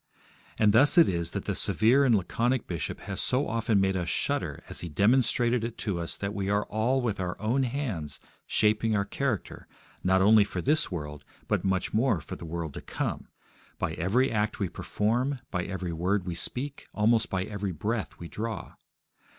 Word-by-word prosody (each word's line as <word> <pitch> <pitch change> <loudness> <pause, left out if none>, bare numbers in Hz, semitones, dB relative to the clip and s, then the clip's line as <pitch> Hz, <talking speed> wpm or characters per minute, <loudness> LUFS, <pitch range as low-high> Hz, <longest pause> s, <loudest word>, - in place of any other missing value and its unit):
And 105 -2 +4
thus 140 +8 +5
it 170 - +8
is 85 -2 -1
that - - -5
the - - -1
severe 125 +6 +3
and 120 -4 +5
laconic 120 +6 0
bishop 85 -5 -4
has 95 - -3
so 130 +3 +1
often 115 -2 +1
made 95 0 +2
us 90 -2 -1
shudder - - -1
as - - -5
he 85 - -5
demonstrated 120 - +3
it 115 0 -4
to 100 -5 -2
us 85 - -2
that 100 0 -3
we 100 -2 -2
are 105 +1 +2
all 120 +5 0
with 110 -5 -1
our 90 -1 -3
own 115 +6 +1
hands 120 - -3 0.3
shaping 110 +1 +2
our 100 -1 +1
character 125 0 -3 0.4
not 95 +1 +4
only 105 +2 +6
for 95 -2 -5
this 150 - +2
world, 75 -4 -5 0.2
but - - 0
much 95 -1 0
more 115 -3 +2
for - - -7
the - - -9
world 80 -2 -4
to - - -7
come, - - -4 0.5
by - - -1
every 120 +11 +1
act 105 -1 0
we 100 -4 0
perform, 120 +11 -1
by 90 -4 -1
every 95 -3 -4
word 90 +4 0
we 90 - -3
speak, 135 - -3
almost 110 +2 +3
by 95 -1 -1
every 100 -1 -3
breath 105 +7 -3
we 85 - -8
draw. 110 +5 -5
105 Hz, 190 wpm, -28 LUFS, 90-120 Hz, 0.5 s, it